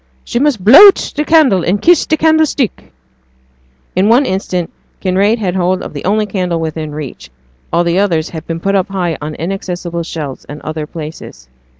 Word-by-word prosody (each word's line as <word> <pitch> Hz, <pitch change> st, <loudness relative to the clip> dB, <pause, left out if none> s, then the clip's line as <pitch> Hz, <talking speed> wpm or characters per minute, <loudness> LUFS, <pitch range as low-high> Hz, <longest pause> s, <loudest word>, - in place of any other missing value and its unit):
'She 240 Hz, -, -2 dB
must 270 Hz, -8 st, 0 dB
blow 280 Hz, -, +10 dB
out 390 Hz, -, +6 dB
t' 300 Hz, -, -3 dB
candle 300 Hz, -, +3 dB
and 190 Hz, +5 st, 0 dB
kiss 350 Hz, 0 st, +4 dB
t' 315 Hz, -, +1 dB
candlestick.' 310 Hz, -, +1 dB, 1.0 s
In 190 Hz, +3 st, +2 dB
one 250 Hz, +5 st, +4 dB
instant 185 Hz, -4 st, -3 dB, 0.3 s
Kinraid 195 Hz, +4 st, +1 dB
had 190 Hz, -5 st, -2 dB
hold 185 Hz, 0 st, 0 dB
of -, -, -8 dB
the 145 Hz, -, -7 dB
only 210 Hz, +3 st, +1 dB
candle 180 Hz, -4 st, -2 dB
within 160 Hz, -1 st, -4 dB
reach, 140 Hz, -, -8 dB, 0.4 s
all 170 Hz, -, +2 dB
the 170 Hz, +2 st, +1 dB
others 170 Hz, -5 st, 0 dB
had 160 Hz, -1 st, -8 dB
been 165 Hz, 0 st, -4 dB
put 195 Hz, +3 st, -1 dB
up 195 Hz, 0 st, +1 dB
high 180 Hz, -5 st, -2 dB
on 150 Hz, +1 st, -5 dB
inaccessible 175 Hz, -1 st, -4 dB
shelves 155 Hz, -5 st, -6 dB
and 145 Hz, +1 st, -9 dB
other 155 Hz, -1 st, -5 dB
places. 150 Hz, -, -9 dB
180 Hz, 185 wpm, -14 LUFS, 160-215 Hz, 1.0 s, blow